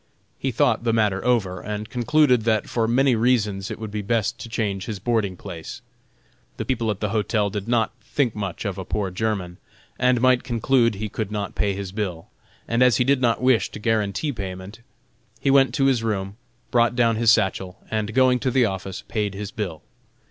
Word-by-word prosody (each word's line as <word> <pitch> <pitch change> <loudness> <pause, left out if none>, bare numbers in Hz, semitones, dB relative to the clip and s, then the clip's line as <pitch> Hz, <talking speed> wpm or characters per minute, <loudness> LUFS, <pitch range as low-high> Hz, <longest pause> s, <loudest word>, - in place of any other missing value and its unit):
He - - -1
thought - - +2
the 115 -1 +1
matter 105 -4 +1
over, 100 -8 +1
and 105 +1 -5
concluded 125 0 +3
that 110 -2 +1
for 115 -2 0
many 130 +3 +3
reasons 105 -5 +1
it - - -5
would 110 -2 -6
be 105 0 -3
best 115 +2 -1
to 115 - -8
change 100 -4 -2
his 110 -3 -3
boarding 100 -3 -1
place. 85 -5 -8 0.8
The - - -3
people 115 -4 -1
at 105 -2 -3
the 105 - 0
hotel 105 -1 0
did 100 +1 -4
not 115 -2 +2
think 130 -6 0
much 100 -2 -4
of 100 -2 -3
a - - -4
poor 95 0 -2
German, 95 -3 -2 0.4
and 125 -1 +3
might 130 0 +3
conclude 120 -2 +2
he 105 +2 -4
could 105 0 -4
not 105 -1 -3
pay 100 -2 0
his 100 -1 -5
bill, 95 -5 -4 0.4
and 115 +1 0
as 125 -3 +5
he - - +3
did 135 0 +2
not 120 0 +1
wish 130 -3 +3
to - - -9
guarantee 110 +5 0
payment, 95 0 -7 0.6
he 135 - +2
went 135 -1 +5
to 135 - +2
his 130 -4 +3
room, 100 -3 -2 0.4
brought 120 0 +3
down 115 -2 +3
his 115 0 +5
satchel, 95 -4 +1
and 110 0 -2
going 130 -1 +4
to 130 - 0
the 125 -1 +3
office, 95 -2 -4
paid 105 -3 -2
his 100 0 -5
bill. 95 -8 -5
110 Hz, 200 wpm, -23 LUFS, 100-120 Hz, 0.8 s, as